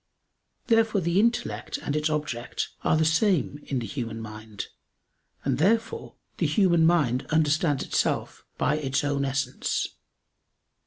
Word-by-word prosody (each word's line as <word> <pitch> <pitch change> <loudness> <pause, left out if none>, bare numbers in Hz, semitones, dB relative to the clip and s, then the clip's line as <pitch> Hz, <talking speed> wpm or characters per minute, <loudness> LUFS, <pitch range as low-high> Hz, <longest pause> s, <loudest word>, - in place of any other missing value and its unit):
Therefore 225 -3 +3
the 170 +1 +1
intellect 125 - 0
and 145 - -3
its 150 +1 +1
object 150 -6 -2
are 155 - +3
the 160 - +3
same 160 -2 +2
in 135 - -1
the 120 - -2
human 115 -3 -4
mind; 110 -2 -7 0.8
and 135 -1 0
therefore 225 +7 +1 0.2
the - - +1
human 170 -6 +4
mind 140 -8 +2
understands 155 -2 +2
itself - - -1
by 150 - +1
its 135 -1 0
own 140 -1 0
essence. 135 +1 -1
150 Hz, 135 wpm, -26 LUFS, 130-170 Hz, 0.8 s, human